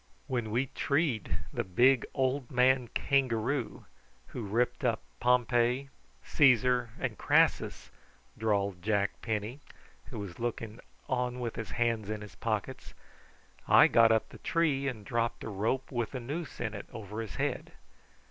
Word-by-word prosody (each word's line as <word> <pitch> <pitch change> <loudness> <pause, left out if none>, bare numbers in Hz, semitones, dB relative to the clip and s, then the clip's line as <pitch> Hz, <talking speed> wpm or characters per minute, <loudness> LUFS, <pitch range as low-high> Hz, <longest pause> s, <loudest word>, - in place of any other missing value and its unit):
"When 120 -5 -2
we 120 +5 +1
treed 140 - 0 0.2
the - - -1
big 120 +8 +3
old 130 -1 0
man 125 0 +3
kangaroo 130 -1 0 0.4
who 115 -4 -5
ripped 120 +7 0
up 115 -3 +1 0.2
Pompey, 125 +1 +2 0.4
Caesar, 125 -3 +4
and - - -3
Crassus," - - +2 0.4
drawled 100 -4 0
Jack 100 0 +1
Penny, 110 +3 -3 0.5
who - - -9
was 100 -4 -7
looking 115 -1 -4 0.3
on 125 -2 -1
with 120 -2 -3
his 110 -4 -5
hands 115 -3 0
in 110 -1 -3
his 105 - -10
pockets, 115 +3 -4 0.7
"I - - +8
got 115 -1 +5
up 110 -1 +2
the - - -13
tree 150 -5 +1
and 110 -6 -4
dropped 115 +2 -1
a - - -5
rope 110 +8 -1
with 120 -1 -2
a - - -2
noose 145 +6 -5
in 110 -3 -2
it 100 - -7
over 110 -1 -6
his 110 -7 -7
head. - - -2
120 Hz, 150 wpm, -30 LUFS, 110-130 Hz, 0.7 s, I